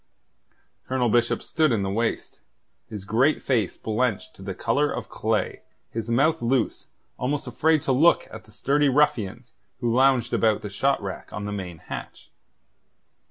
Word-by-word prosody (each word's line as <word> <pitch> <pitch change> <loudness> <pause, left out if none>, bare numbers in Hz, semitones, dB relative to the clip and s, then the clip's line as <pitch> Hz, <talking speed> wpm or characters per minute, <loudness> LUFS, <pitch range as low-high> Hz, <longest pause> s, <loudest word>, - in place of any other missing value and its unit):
Colonel 130 -2 +1
Bishop 120 +1 +2
stood 155 -3 +1
in 110 -4 +1
the 95 - -1
waist, 110 +2 -2 0.5
his 105 -3 -7
great 125 +9 +2
face 115 -9 0
blenched 110 0 -1
to - - -15
the 95 -1 -5
colour 140 +9 +1
of - - -5
clay, - - -1 0.3
his 115 0 -4
mouth 155 +7 +2
loose, 120 0 0 0.3
almost 140 +3 -1
afraid 160 -2 +2
to - - 0
look 155 +7 +4
at 110 - -10
the 110 - -19
sturdy 140 +6 +2
ruffians 125 -4 +1 0.3
who 120 -2 0
lounged 130 -2 +3
about 110 -2 +2
the 105 - -5
shot 135 +7 +1
rack 95 -2 -6
on 105 +1 -5
the 105 - -4
main 95 -4 -5
hatch. - - -9
120 Hz, 160 wpm, -25 LUFS, 105-135 Hz, 0.5 s, look